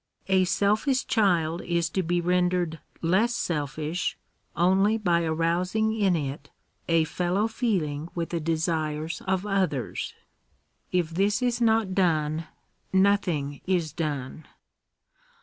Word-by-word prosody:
A 190 -1 +4
selfish 215 - +1
child 175 -8 +2
is 170 -1 0
to 190 - 0
be 175 0 0
rendered 180 -2 +1 0.2
less 205 +9 +2
selfish, 155 +2 -2 0.4
only 195 +5 +3
by 175 -6 +2
arousing 175 +7 0
in 200 -5 +2
it 140 -2 -4 0.4
a 165 -1 +4
fellow 180 +6 0
feeling 175 - -1
with 170 -1 -2
the 170 - -2
desires 160 -1 -1
of 190 +1 0
others. 190 -10 -1 0.8
If 175 -3 0
this 200 +7 +1
is 245 -1 0
not 220 -4 +2
done, 160 -4 +1 0.4
nothing 185 -8 +1
is 175 -5 0
done. 150 -2 -4
175 Hz, 115 wpm, -26 LUFS, 160-195 Hz, 0.8 s, A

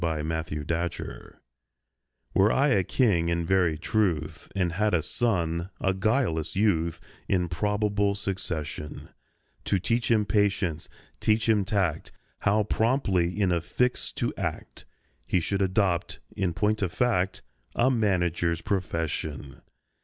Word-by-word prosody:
A 80 -2 -1
MANAGER'S 80 -1 -3
PERPLEXITIES 85 -7 -4 1.0
WERE 100 +3 +4
I 140 +2 +3
a 100 -8 +3
king 90 -6 +2
in 85 0 0
very 90 -3 +2
truth, 90 -2 -1
And 90 -3 +1
had 105 +3 +1
a 80 - +1
son—a 90 -3 -1
guileless 95 - 0
youth— 85 -5 +1 0.3
In 90 -2 +1
probable 100 +3 0
succession; 85 -7 -5 0.6
To 100 - +2
teach 115 +6 0
him 110 -3 +3
patience, 100 -6 0 0.3
teach 110 +1 +2
him 110 -3 +4
tact, 95 -5 -1 0.3
How 105 +2 +2
promptly 105 -6 +1
in 95 -3 +3
a 85 -1 +1
fix 125 +8 -1
to - - -1
act, - - -5 0.4
He 90 - +2
should 100 +4 -1
adopt, 95 -2 +1 0.2
in 90 -4 -1
point 110 0 +1
of 95 -3 0
fact, 105 -7 0 0.3
A 130 +3 +3
manager's 90 -7 +1
profession. 80 -6 -3
95 Hz, 130 wpm, -27 LUFS, 85-105 Hz, 1.0 s, WERE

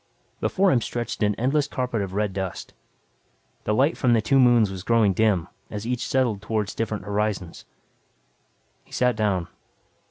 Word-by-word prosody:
Before 195 0 +2
him 120 - +3
stretched 120 0 -4
an 105 -1 +2
endless 140 +5 +1
carpet 125 -5 -2
of 95 -1 -4
red 105 -1 0
dust. 95 -2 -5 0.9
The 105 - +1
light 140 +7 +3
from 125 -3 +2
the 115 - +4
two 135 +5 +3
moons 120 -5 +5
was 95 -1 -6
growing 110 -1 +3
dim, 95 -4 +2 0.2
as 105 0 -6
each 125 +1 -2
settled 120 -7 +1
toward 105 -1 -2
different 110 -3 -3
horizons. 100 -4 -2 1.2
He - - -27
sat 125 -2 +2
down. 100 -5 0
110 Hz, 160 wpm, -24 LUFS, 100-125 Hz, 1.2 s, moons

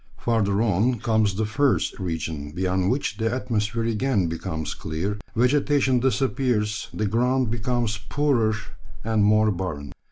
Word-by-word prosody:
Further 110 -3 +1
on 115 +4 +2
comes 110 -3 +1
the 110 +2 0
furze 135 +5 +1
region, 80 -5 -4
beyond 95 +1 0
which 125 -4 -1
the 115 0 0
atmosphere 115 -3 -1
again 115 -2 +1
becomes 80 -1 -4
clear, 95 +7 -3 0.2
vegetation 130 +1 +3
disappears, 125 -5 0
the 110 - -2
ground 125 +3 +1
becomes 120 -2 -1
poorer 125 -7 +2 0.5
and 110 -2 +1
more 110 +1 +4
barren. 85 -7 -4
110 Hz, 130 wpm, -24 LUFS, 95-125 Hz, 0.5 s, more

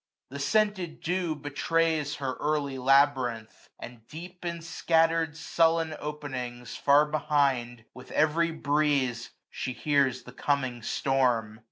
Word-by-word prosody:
The 140 - -6
scented 195 0 0
dew 175 -2 -1
Betrays 150 +1 0
her 135 -2 -3
early 145 -3 -1
labyrinth; 130 -4 +1
and 120 0 -10
deep, 175 +3 -10
415 170 -1 -3
In 170 - -10
scattered 165 -1 +1
sullen 165 -1 +1
openings, 130 -5 -6
far 145 +1 +4
behind. 140 -6 0
With 125 - -13
every 160 +2 +2
breeze 145 -6 0 0.2
she 130 - -4
hears 135 -2 +1
the 125 - -11
coming 130 -3 -1
storm. 120 -4 0
145 Hz, 125 wpm, -28 LUFS, 130-160 Hz, 0.2 s, far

